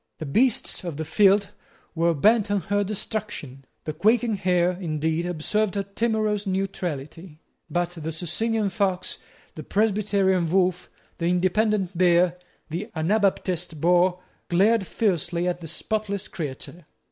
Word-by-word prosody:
The 160 Hz, -, -6 dB
beasts 225 Hz, -, +1 dB
of 170 Hz, -5 st, -5 dB
the 160 Hz, -, -3 dB
field 200 Hz, +4 st, +3 dB, 0.4 s
were 170 Hz, 0 st, +2 dB
bent 210 Hz, +7 st, +3 dB
on 205 Hz, -1 st, +1 dB
her 205 Hz, +4 st, 0 dB
destruction. 195 Hz, -, -5 dB, 0.2 s
The 155 Hz, -, -4 dB
quaking 225 Hz, +5 st, +2 dB
hare, 180 Hz, -3 st, +2 dB
indeed, 160 Hz, -1 st, -2 dB
observed 195 Hz, +5 st, -1 dB
a 200 Hz, -, 0 dB
timorous 210 Hz, 0 st, -1 dB
neutrality: 175 Hz, -4 st, -4 dB, 0.3 s
but 175 Hz, 0 st, 0 dB
the 160 Hz, -2 st, -5 dB
Socinian 205 Hz, +6 st, -1 dB
fox, 190 Hz, -3 st, -1 dB, 0.3 s
the 155 Hz, -, -7 dB
Presbyterian 195 Hz, -2 st, +1 dB
wolf, 180 Hz, 0 st, +1 dB, 0.3 s
the 170 Hz, -, 0 dB
Independent 185 Hz, +2 st, +1 dB
bear, 175 Hz, 0 st, +3 dB, 0.3 s
the 190 Hz, +8 st, -4 dB
Anabaptist 180 Hz, -2 st, 0 dB
boar, 180 Hz, +2 st, +3 dB, 0.3 s
glared 195 Hz, +3 st, +3 dB
fiercely 175 Hz, -4 st, 0 dB
at 175 Hz, -1 st, -1 dB
the 165 Hz, -, -8 dB
spotless 200 Hz, +3 st, -3 dB
creature. 155 Hz, +2 st, -7 dB
185 Hz, 130 wpm, -25 LUFS, 170-205 Hz, 0.4 s, field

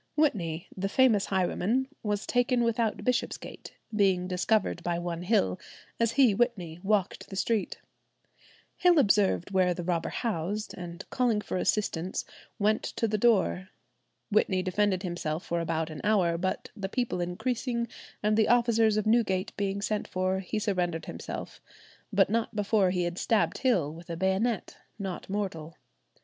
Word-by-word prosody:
Whitney, 180 Hz, -, 0 dB
the 195 Hz, +1 st, -2 dB
famous 225 Hz, -3 st, +4 dB
highwayman, 195 Hz, +7 st, +1 dB
was 210 Hz, -1 st, -2 dB
taken 245 Hz, 0 st, +2 dB
without 230 Hz, -1 st, 0 dB
Bishopsgate, 250 Hz, -1 st, -3 dB, 0.2 s
being 190 Hz, -3 st, +2 dB
"discovered 185 Hz, 0 st, +1 dB
by 175 Hz, 0 st, -1 dB
one 175 Hz, -1 st, -3 dB
Hill, 175 Hz, -, +1 dB, 0.4 s
as 230 Hz, -1 st, +2 dB
he 260 Hz, -5 st, +5 dB
(Whitney) 190 Hz, -8 st, -1 dB
walked 200 Hz, -1 st, 0 dB
the 195 Hz, -, -7 dB
street. 215 Hz, +2 st, 0 dB, 1.0 s
Hill 355 Hz, -2 st, +5 dB
observed 200 Hz, -, +3 dB
where 185 Hz, -2 st, +3 dB
the 175 Hz, -, -4 dB
robber 170 Hz, -1 st, -1 dB
'housed,' 210 Hz, -1 st, -2 dB
and 175 Hz, +1 st, -8 dB
calling 245 Hz, -5 st, +2 dB
for 210 Hz, -, -5 dB
assistance, 185 Hz, -3 st, -1 dB, 0.3 s
went 215 Hz, 0 st, +2 dB
to 230 Hz, -, -2 dB
the 215 Hz, 0 st, -1 dB
door." 195 Hz, -5 st, +2 dB, 0.6 s
Whitney 190 Hz, -3 st, +2 dB
defended 190 Hz, 0 st, +1 dB
himself 170 Hz, -2 st, -3 dB
for 170 Hz, -, -1 dB
about 160 Hz, -1 st, -1 dB
an 155 Hz, -, -7 dB
hour, 190 Hz, -6 st, +3 dB
but 185 Hz, +2 st, -3 dB
the 195 Hz, -3 st, -4 dB
people 240 Hz, -6 st, -1 dB
increasing, 235 Hz, +6 st, -2 dB, 0.4 s
and 210 Hz, 0 st, +3 dB
the 220 Hz, 0 st, +3 dB
officers 230 Hz, -2 st, +4 dB
of 215 Hz, -, 0 dB
Newgate 215 Hz, -4 st, +1 dB
being 200 Hz, 0 st, -2 dB
sent 215 Hz, 0 st, -1 dB
for, 185 Hz, +1 st, 0 dB
he 190 Hz, +3 st, -4 dB
surrendered 180 Hz, -6 st, -1 dB
himself, -, -, -7 dB, 0.5 s
but 195 Hz, -2 st, +4 dB
not 225 Hz, +1 st, -1 dB
before 205 Hz, -2 st, +2 dB
he 180 Hz, -1 st, 0 dB
had 175 Hz, +1 st, -3 dB
stabbed 225 Hz, -2 st, +1 dB
Hill 185 Hz, -, +2 dB
with 170 Hz, +1 st, -12 dB
a 165 Hz, -, -4 dB
bayonet, 190 Hz, +4 st, 0 dB, 0.2 s
"not 190 Hz, -4 st, -5 dB
mortal." 180 Hz, -6 st, -4 dB
195 Hz, 155 wpm, -29 LUFS, 180-220 Hz, 1.0 s, he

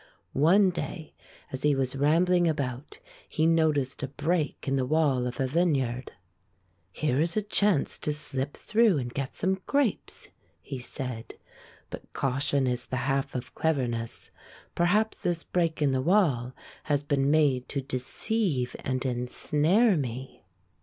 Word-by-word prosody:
One 185 Hz, +7 st, +5 dB
day, 165 Hz, -2 st, -5 dB, 0.4 s
as 130 Hz, -, -5 dB
he 150 Hz, -1 st, +3 dB
was 135 Hz, -1 st, -1 dB
rambling 170 Hz, +5 st, +3 dB
about, 140 Hz, -4 st, -3 dB, 0.3 s
he 155 Hz, -, +1 dB
noticed 155 Hz, -5 st, +2 dB
a 135 Hz, -, -2 dB
break 150 Hz, +3 st, -2 dB
in 135 Hz, -, +1 dB
the 135 Hz, -1 st, +1 dB
wall 140 Hz, -5 st, +2 dB
of 125 Hz, -, -6 dB
a 135 Hz, -, +2 dB
vineyard. 130 Hz, -5 st, 0 dB, 0.8 s
''Here 145 Hz, +4 st, 0 dB
is 170 Hz, +4 st, -1 dB
a 215 Hz, -, +1 dB
chance 205 Hz, -5 st, +1 dB
to 150 Hz, -, -1 dB
slip 145 Hz, -2 st, -3 dB
through 215 Hz, -5 st, +3 dB
and 120 Hz, -3 st, -4 dB
get 135 Hz, -1 st, -4 dB
some 190 Hz, 0 st, 0 dB
grapes," 280 Hz, -7 st, -1 dB, 0.3 s
he 135 Hz, -2 st, -7 dB
said. 125 Hz, -2 st, -6 dB, 0.6 s
"But -, -, -9 dB
caution 135 Hz, +1 st, +1 dB
is 125 Hz, -1 st, -2 dB
the 130 Hz, 0 st, -2 dB
half 135 Hz, -1 st, -1 dB
of 125 Hz, 0 st, -5 dB
cleverness 120 Hz, -7 st, -2 dB, 0.2 s
— -, -, -23 dB
perhaps 205 Hz, +6 st, +1 dB
this 170 Hz, -1 st, -1 dB
break 165 Hz, -3 st, 0 dB
in 140 Hz, -, +3 dB
the 130 Hz, -1 st, +1 dB
wall 140 Hz, -, +2 dB, 0.3 s
has 145 Hz, -2 st, +1 dB
been 140 Hz, -1 st, +1 dB
made 145 Hz, -5 st, +2 dB
to 140 Hz, -, -2 dB
deceive 135 Hz, -, -1 dB
and 130 Hz, 0 st, -2 dB
en 125 Hz, -1 st, -1 dB
snare 180 Hz, -, +3 dB
me." 130 Hz, -1 st, -5 dB
145 Hz, 155 wpm, -28 LUFS, 130-165 Hz, 0.8 s, One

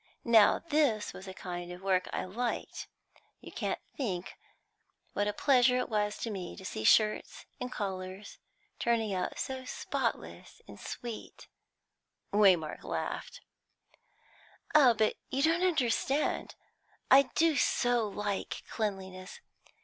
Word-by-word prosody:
Now 225 Hz, -4 st, +6 dB
this 290 Hz, -10 st, +1 dB
was 190 Hz, -, -10 dB
a -, -, -5 dB
kind 175 Hz, -1 st, -6 dB
of 180 Hz, +1 st, -10 dB
work 185 Hz, -1 st, +1 dB
I -, -, -2 dB
liked. 235 Hz, +6 st, -4 dB, 0.5 s
You -, -, -11 dB
can't -, -, -2 dB, 0.2 s
think 195 Hz, -9 st, -3 dB, 0.8 s
what 205 Hz, -, 0 dB
a -, -, +1 dB
pleasure 250 Hz, +1 st, +4 dB
it 250 Hz, -, -1 dB
was 210 Hz, -1 st, 0 dB
to 230 Hz, -, -2 dB
me 185 Hz, -4 st, -5 dB
to 190 Hz, -, -10 dB
see 110 Hz, -, -4 dB
shirts 215 Hz, -, +3 dB
and 250 Hz, -1 st, -4 dB
collars 190 Hz, -1 st, -5 dB, 0.4 s
turning 225 Hz, -3 st, +1 dB
out 180 Hz, -1 st, -2 dB
so 265 Hz, -1 st, -4 dB
spotless 255 Hz, -, -4 dB
and -, -, -12 dB
sweet 235 Hz, -3 st, -7 dB, 0.4 s
" -, -, -48 dB
Waymark 185 Hz, -7 st, +3 dB
laughed. -, -, -4 dB, 1.3 s
"Oh, 270 Hz, -6 st, +7 dB
but 215 Hz, 0 st, +1 dB
you 270 Hz, +1 st, 0 dB
don't 330 Hz, +2 st, +3 dB
understand. 290 Hz, -4 st, +1 dB, 0.6 s
I 270 Hz, 0 st, +7 dB
do 325 Hz, -1 st, +4 dB
so 245 Hz, -4 st, +2 dB
like 205 Hz, -1 st, -3 dB
cleanliness! 190 Hz, -3 st, -4 dB
215 Hz, 130 wpm, -31 LUFS, 190-250 Hz, 1.3 s, Oh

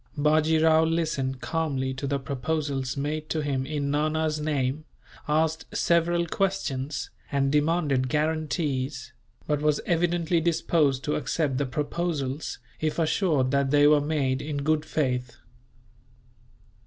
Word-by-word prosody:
Bajee 155 Hz, +2 st, +3 dB
Rao 160 Hz, 0 st, +5 dB
listened 155 Hz, -6 st, -1 dB
calmly 140 Hz, -5 st, -1 dB
to 135 Hz, +2 st, -4 dB
the 140 Hz, 0 st, 0 dB
proposals 140 Hz, 0 st, -2 dB
made 155 Hz, +2 st, -3 dB
to 155 Hz, -, 0 dB
him 135 Hz, -2 st, -1 dB
in 145 Hz, -2 st, -2 dB
Nana's 155 Hz, +1 st, 0 dB
name, 145 Hz, -1 st, -1 dB, 0.4 s
asked 160 Hz, +1 st, +1 dB
several 170 Hz, 0 st, +2 dB
questions, 160 Hz, -7 st, -2 dB, 0.2 s
and 135 Hz, -1 st, +1 dB
demanded 150 Hz, -4 st, +1 dB
guarantees; 150 Hz, -3 st, -1 dB, 0.3 s
but 150 Hz, -1 st, 0 dB
was 150 Hz, -1 st, +2 dB
evidently 170 Hz, 0 st, +1 dB
disposed 155 Hz, -4 st, +1 dB
to 150 Hz, -, -1 dB
accept 145 Hz, -5 st, -1 dB
the 145 Hz, -, 0 dB
proposals, 150 Hz, 0 st, -2 dB, 0.2 s
if 155 Hz, -1 st, -1 dB
assured 155 Hz, -5 st, +1 dB
that 140 Hz, -1 st, +2 dB
they 145 Hz, +1 st, +5 dB
were 150 Hz, 0 st, +6 dB
made 140 Hz, -3 st, 0 dB
in 150 Hz, -1 st, -4 dB
good 155 Hz, +1 st, +1 dB
faith. 125 Hz, -6 st, -1 dB
150 Hz, 130 wpm, -26 LUFS, 135-160 Hz, 0.4 s, were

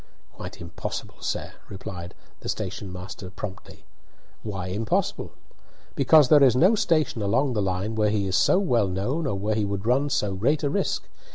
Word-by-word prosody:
"Quite -, -, -9 dB
impossible, 85 Hz, -1 st, -6 dB
sir," -, -, -3 dB, 0.2 s
replied 90 Hz, -2 st, -7 dB, 0.2 s
the -, -, -6 dB
station 95 Hz, -2 st, -4 dB
master 90 Hz, +1 st, -8 dB
promptly. 95 Hz, +1 st, -9 dB, 0.6 s
"Why 95 Hz, -4 st, -4 dB
impossible?" 105 Hz, +4 st, -1 dB, 0.6 s
"Because 145 Hz, +1 st, +6 dB
there 150 Hz, -2 st, +7 dB
is 130 Hz, -3 st, +6 dB
no 180 Hz, -, +5 dB
station 155 Hz, -, +1 dB
along 125 Hz, +7 st, +1 dB
the 105 Hz, -, 0 dB
line 95 Hz, +3 st, -1 dB
where 105 Hz, -1 st, +2 dB
he 105 Hz, -1 st, 0 dB
is 95 Hz, -1 st, -1 dB
so 105 Hz, -, +4 dB
well 120 Hz, -, +2 dB
known 125 Hz, -, -1 dB
or 100 Hz, -, -1 dB
where 105 Hz, +3 st, -1 dB
he 105 Hz, 0 st, 0 dB
would 100 Hz, 0 st, -3 dB
run 135 Hz, +5 st, +2 dB
so 105 Hz, -7 st, 0 dB
great 130 Hz, +11 st, +1 dB
a 140 Hz, -, +1 dB
risk. 200 Hz, -, -1 dB
105 Hz, 175 wpm, -25 LUFS, 95-135 Hz, 0.6 s, there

